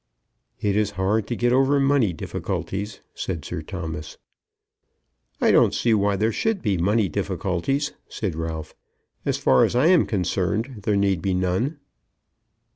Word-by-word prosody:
"It 100 -1 0
is 105 -1 +2
hard 100 +3 +1
to 120 - -2
get 120 +1 +2
over 135 +2 +4
money 135 -7 +3
difficulties," 100 +5 -4
said 85 -6 -4
Sir - - -4
Thomas. 80 -4 -6 1.2
"I - - +4
don't - - +4
see 115 - +2
why 100 -1 +2
there 110 +3 +1
should 220 - -1
be 105 -4 +1
money 100 +4 +2
difficulties," 100 - -1 0.2
said 100 -6 -3
Ralph. 80 -1 -5 0.5
"As - - +1
far 65 - +4
as - - +1
I 125 +4 +4
am 180 -3 +5
concerned 105 +5 -1
there 105 -2 +2
need 100 -4 +1
be 95 +1 0
none." 95 - 0
100 Hz, 150 wpm, -24 LUFS, 90-120 Hz, 1.2 s, am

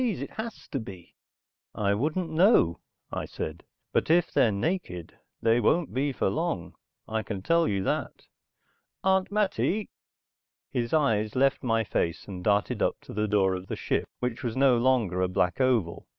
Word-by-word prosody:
T.'s. 230 - 0
It 140 - -6
has 225 +1 -7
to 135 - -2
be." 95 -6 -10 0.6
"I 100 -1 +1
wouldn't 155 - -1
know," 160 - +4 0.3
I - - -3
said. 80 +2 -6 0.3
"But - - +1
if 170 +1 +4
they're 115 - +4
naked 100 - -3 0.3
they 115 +1 +4
won't 160 +8 +2
be 140 +2 0
for 125 - -1
long, 150 - -2 0.3
I 110 0 -1
can 100 -4 -5
tell 165 +4 +3
you 100 -2 0
that. - - -2 0.8
Aunt 190 0 +2
Mattie...." 210 0 0 0.8
His 120 -1 -1
eyes 110 -9 +2
left 135 +1 +3
my 115 -3 +1
face 85 -4 -2
and 90 -3 -7
darted 105 0 +1
up - - +1
to - - -11
the 105 +1 0
door 100 -2 +3
of 95 0 -5
the - - -3
ship - - -1
which 125 0 -3
was 120 0 -3
no 135 -2 +5
longer 115 -7 +2
a 90 - +2
black 90 +4 0
oval. 115 -10 +1
120 Hz, 175 wpm, -27 LUFS, 100-160 Hz, 0.8 s, no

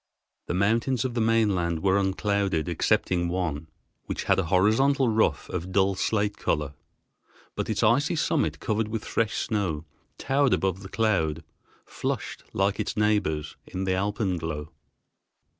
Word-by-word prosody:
The 85 - -1
mountains 115 +6 +1
of 125 - -2
the 115 - 0
mainland 100 -7 +1
were 95 0 +3
unclouded, 95 -4 0
excepting 85 -1 +1
one, 85 -4 -2 0.4
which - - -4
had - - +2
a 95 - 0
horizontal 115 - +3
ruff 110 0 +1
of 90 +1 -4
dull 95 +1 +3
slate 105 +2 0
color, 75 -2 -1 0.8
but - - -3
its 110 +1 0
icy 130 +9 +3
summit 155 -1 0
covered 110 0 -1
with 110 0 -4
fresh 115 -1 0
snow 90 -8 -1 0.3
towered 135 -1 +2
above 95 0 -1
the 95 - -9
cloud, 85 -9 0 0.4
flushed - - -4
like 100 +1 0
its - - -2
neighbors 80 -9 +1
in 95 - -4
the 95 -1 +1
alpenglow. 90 -6 -2
100 Hz, 140 wpm, -26 LUFS, 85-110 Hz, 0.8 s, were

